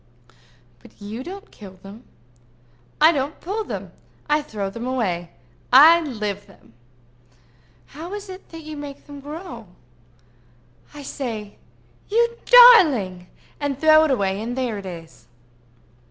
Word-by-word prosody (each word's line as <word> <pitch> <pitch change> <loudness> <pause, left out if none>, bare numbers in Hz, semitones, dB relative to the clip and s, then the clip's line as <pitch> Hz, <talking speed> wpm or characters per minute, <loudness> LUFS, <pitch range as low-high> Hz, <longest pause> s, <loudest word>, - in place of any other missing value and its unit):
"But - - -19
you 215 +5 -7
don't 390 +6 -10
kill 195 -3 -13
them." 205 +5 -13 0.9
"I 310 +2 +7
don't 285 -1 -3
pull 415 +5 -4
them; - - -7 0.4
I 300 0 +2
throw 205 -9 -5
them 235 +4 -6
away. 185 -10 -2 0.4
I 315 +6 +8
live 210 - -5
them." 115 - -21 1.1
"How 325 +5 -10
is 415 0 -8
it 375 0 -11
that 330 -1 -10
you 310 0 -8
make 290 -1 -9
them 285 -1 -11
grow?" 285 - -9 1.2
"I 295 -1 -11
say, 225 -7 -6 0.5
'You 470 +2 +1
darling!' 305 - +7 0.3
and 285 -2 -2
throw 310 0 +6
it - - -1
away 200 -6 0
and 240 +3 -5
there 240 -5 -2
it 195 - -9
is." 160 -9 -11
265 Hz, 135 wpm, -22 LUFS, 205-315 Hz, 1.2 s, I